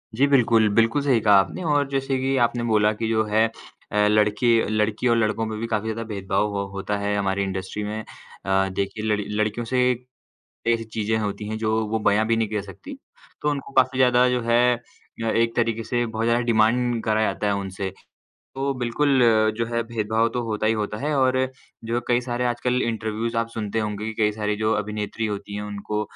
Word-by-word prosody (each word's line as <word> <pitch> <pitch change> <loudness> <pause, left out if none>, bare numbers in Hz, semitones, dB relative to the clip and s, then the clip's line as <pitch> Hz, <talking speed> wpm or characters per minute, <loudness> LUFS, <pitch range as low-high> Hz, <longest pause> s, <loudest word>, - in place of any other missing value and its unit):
जी, 135 +5 +4
बिल्कुल, 115 -5 +4
बिल्कुल 115 +5 +3
सही 135 -4 +3
कहा 105 - +6
आपने 180 - -2
और 145 -1 +2
जैसे 135 -1 -1
कि 135 +1 0
आपने 120 0 -3
बोला 105 0 +4
कि 110 +1 -3
जो 110 -1 +2
है 110 +1 +3 0.5
अ, 105 0 +3
लड़की 105 +3 +2 0.2
लड़की 110 +2 0
और 115 -1 +3
लड़कों 110 0 0
में 110 -1 -4
भी 115 - -3
काफ़ी 110 -2 -1
ज़्यादा 110 +1 -3
भेदभाव 100 0 -1
हो 100 - -1
होता 100 +1 -2
है 100 0 -1
हमारी 100 -1 0
इंडस्ट्री 95 +2 -4
में। 105 +1 -4 0.5
अ 95 0 +2
देखिए, 100 +3 -3
लड़ 105 -1 +1 0.2
लड़कियों 110 +2 -1
से 130 +2 0 0.9
ऐसी 115 -1 +2
चीज़ें 110 0 0
होती 105 -1 -3
हैं 110 +1 -3
जो 110 0 -1 0.2
वो 110 +1 0
बयाँ 105 +2 +2
भी 115 - +2
नहीं 115 -1 +1
कर 105 -1 -2
सकती। 95 -3 -10 0.4
तो 150 - +1
उनको 140 -2 -4
काफ़ी 130 0 +3
ज़्यादा 125 -1 +5
जो 125 0 0
है 120 +1 +3
अ, 115 -1 -12
एक 115 0 +1
तरीके 115 -1 0
से 120 +2 -1
बहुत 110 0 -3
ज़्यादा 115 +1 +2
डिमांड 115 +1 +2
करा 110 -1 +1
जाता 110 -1 0
है 100 - +2
उनसे, 95 -1 -4 0.7
तो 135 +1 -1
बिल्कुल 130 +3 +1 0.4
जो 115 0 -1
है 115 0 -1
भेदभाव 115 0 0
तो 125 - 0
होता 110 -1 -2
ही 110 - +4
होता 105 -1 -3
है। 150 +4 -1
और 130 0 +3 0.4
जो 115 +1 -1
कई 120 0 +3
सारे 125 0 -3
आजकल 125 +1 0
इंटरव्यूज़ 115 0 -2
आप 115 0 0
सुनते 110 -1 -3
होंगे 105 -1 -3
कि - - -15
कई 105 0 +3
सारी 105 0 -2
जो 110 +1 +2
अभिनेत्री 105 +2 -4
होती 100 -1 -5
हैं, 105 - -4
उनको 105 +1 -3
110 Hz, 205 wpm, -23 LUFS, 105-120 Hz, 0.9 s, कहा